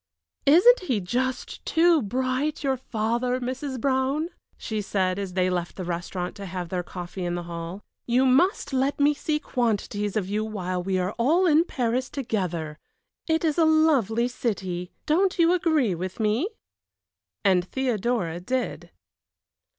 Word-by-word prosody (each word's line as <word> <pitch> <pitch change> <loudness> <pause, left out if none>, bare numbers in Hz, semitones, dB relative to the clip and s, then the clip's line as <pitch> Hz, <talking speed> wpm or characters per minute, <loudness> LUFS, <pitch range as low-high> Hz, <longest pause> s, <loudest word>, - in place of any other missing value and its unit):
"Isn't 375 - +7
he 260 - -1
just 250 +7 -3
too 330 -1 +4
bright 255 +7 -1
your 270 -1 +2
father, 240 +1 -1
Mrs. 260 +1 -4
Brown?" 270 +5 0 0.3
she 215 -2 -3
said 190 -1 0
as 195 -2 -4
they 185 0 +2
left 175 -1 -2
the 185 - -5
restaurant 175 +1 -4
to 200 -1 -7
have 180 -1 -5
their 180 0 -1
coffee 180 +1 -7
in 175 0 -1
the 175 - -4
hall. 170 +3 -6 0.2
"You 250 +2 +3
must 270 - +2
let 270 +2 +1
me 290 +1 +4
see 300 +1 -1
quantities 210 -5 -1
of 195 -4 -1
you 210 +2 -1
while 185 -4 -3
we 190 +1 -1
are 185 +2 -1
all 320 +10 +3
in 325 0 +5
Paris 250 -3 -1
together. 175 - -3 0.5
It 320 0 +1
is 315 +1 +1
a - - +6
lovely 275 -8 +3
city; 190 -8 -3
don't 365 +5 +2
you 335 0 +5
agree 315 - +2
with 185 +4 -5
me?" 220 - +1 1.0
And 185 -2 +4
Theodora 225 -6 -1
did. 250 +8 -3
235 Hz, 155 wpm, -25 LUFS, 185-280 Hz, 1.0 s, Isn't